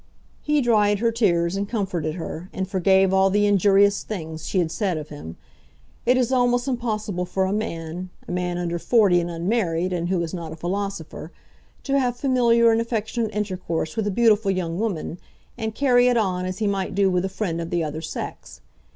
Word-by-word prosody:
He 300 -1 +1
dried 210 -4 +3
her 230 +2 +1
tears 175 -6 +1
and 200 +1 -2
comforted 180 -8 -2
her, 175 +1 -6
and 190 0 -3
forgave 190 0 +3
all 190 0 +4
the 205 +2 +2
injurious 200 0 +4
things 160 -6 -6
she - - -2
had 170 -3 +1
said 190 -3 -1
of 150 -1 -7
him. 115 - -9 0.7
It 250 +1 +5
is 250 -1 +1
almost 245 0 +2
impossible 215 -7 -2
for 190 +1 0
a 190 - -1
man, 180 -4 -4 0.2
a - - -5
man 180 0 -2
under 170 -1 -2
forty 200 -5 +4
and 170 - -4
unmarried, 175 0 -1
and 175 0 -2
who 185 -1 +1
is 165 - -5
not 170 -3 -5
a - - -6
philosopher, 175 -2 -4 0.5
to 275 0 +1
have 245 -2 0
familiar 235 -3 +4
and 225 0 +2
affectionate 230 0 -2
intercourse 185 -6 -3
with 220 -2 -1
a - - +1
beautiful 215 -1 +3
young 180 -2 -1
woman, 185 -5 -3 0.4
and 220 -2 -4
carry 250 -3 +4
it 245 -1 +3
on 185 -4 0
as 185 0 -4
he 220 - -1
might 195 -2 -1
do 195 -1 +3
with 180 0 +1
a 190 - -1
friend 175 -4 -3
of 165 - -5
the 175 -1 0
other 155 +1 -4
sex. 160 - -7
195 Hz, 200 wpm, -23 LUFS, 175-220 Hz, 0.7 s, It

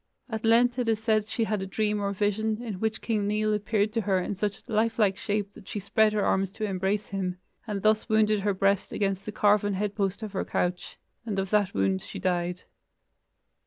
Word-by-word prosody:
At 220 0 -3
length 240 +2 +4
it 240 -2 0
is 220 - +3
said 215 -1 +1
she 225 +1 -1
had 215 -2 -1
a 190 - -4
dream 210 +1 0
or 200 0 0
vision, 210 +2 0
in 210 -6 -5
which 220 +1 -2
King 215 -3 0
Nial 215 +1 +1
appeared 210 0 0
to 230 - +1
her 195 -2 +1
in 180 - -2
such 200 0 -3
life 225 0 +1
like 205 -4 +3
shape 205 0 -2
that 210 - -14
she 210 - -4
spread 215 +2 +3
her 210 -1 +1
arms 190 0 +2
to 215 - -3
embrace 195 +1 -1
him, 185 -2 -2 0.3
and 200 -3 -3
thus 215 +2 +2
wounded 215 -1 +3
her 200 0 0
breast 195 0 +1
against 195 -1 -1
the 210 - -4
carven 205 -1 +3
head 205 +1 -1
post 200 0 -2
of 215 - -5
her 190 - -1
couch, 180 0 -2 0.3
and 215 -4 -3
of 195 -1 -2
that 205 -3 +2
wound 95 -1 +1
she - - -8
died. 180 0 -1
205 Hz, 220 wpm, -27 LUFS, 195-215 Hz, 0.3 s, length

